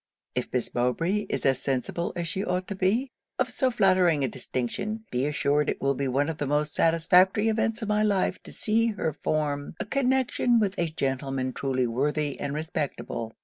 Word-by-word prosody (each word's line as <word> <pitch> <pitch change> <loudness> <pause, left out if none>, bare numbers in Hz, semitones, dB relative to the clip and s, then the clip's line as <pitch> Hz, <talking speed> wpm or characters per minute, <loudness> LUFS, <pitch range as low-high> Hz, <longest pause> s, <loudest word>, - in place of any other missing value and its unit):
'If 125 - -3
Miss 125 -2 -1
Mowbray 165 +12 0
is - - -2
as 135 -2 +3
sensible 135 +6 -1
as 170 -1 -2
she 190 +4 -2
ought 180 -1 -1
to 200 - -3
be, 220 +8 +1 0.3
of - - 0
so 260 - +1
flattering 185 - +3
a - - +2
distinction, 195 - -3
be 125 +3 0
assured 145 0 +1
it - - -2
will 140 0 +1
be 140 0 -2
one 135 +3 +1
of 160 -2 -4
the 145 - -1
most 150 +1 0
satisfactory 180 +6 +4
events 225 +1 0
of - - -3
my 210 0 +2
life 205 -3 +1
to - - -8
see 225 +2 +1
her 205 -8 -1
form 145 -1 -2
a - - -2
connection 255 -1 +2
with 200 -3 +1
a 170 -1 +1
gentleman 135 -3 -2
truly 130 -2 0
worthy 145 +4 -1
and 140 0 -3
respectable. 145 -7 -3
160 Hz, 190 wpm, -27 LUFS, 135-205 Hz, 0.3 s, satisfactory